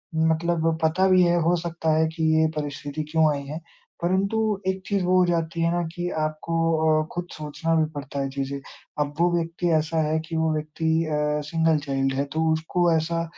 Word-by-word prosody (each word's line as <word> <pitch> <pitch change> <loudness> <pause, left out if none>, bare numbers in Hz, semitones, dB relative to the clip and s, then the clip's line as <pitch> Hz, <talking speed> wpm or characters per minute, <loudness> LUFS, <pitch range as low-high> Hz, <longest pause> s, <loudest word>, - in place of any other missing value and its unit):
मतलब 160 0 +1
पता 175 +4 +3
भी 185 -1 +6
है, 175 0 +3
हो 170 +2 +3
सकता 165 -2 -1
है 160 0 +3
कि 160 - -2 0.2
ये 160 - +4
परिस्थिति 145 0 -4
क्यों 160 -1 +4
आई 140 -1 -4
है, 150 +4 -5 0.4
परंतु 190 +5 +1 0.3
एक 190 0 -1
चीज़ 200 -3 0
वो 185 +1 +3
हो 180 - +5
जाती 165 -1 -1
है 165 0 +2
ना 175 0 0
कि 175 0 -3
आपको 155 +2 -2 0.5
अ, - - -8
खुद 175 0 -4
सोचना 155 +2 -3
भी 160 -1 +3
पड़ता 145 -1 -6
है 135 0 -1
चीज़ें। 140 0 -4 0.4
अब 145 0 -1
वो 175 +1 +4
व्यक्ति 170 +1 -1
ऐसा 160 +1 +1
है 155 +1 +1
कि 165 - -5
वो 160 0 +1
व्यक्ति 155 +1 -4 0.2
अ, 150 -1 0
सिंगल 160 -1 +2
चाइल्ड 135 -1 0
है, 135 +1 0
तो 160 +3 -2
उसको 170 +2 +1
ऐसा 165 +1 0
160 Hz, 200 wpm, -24 LUFS, 155-170 Hz, 0.5 s, भी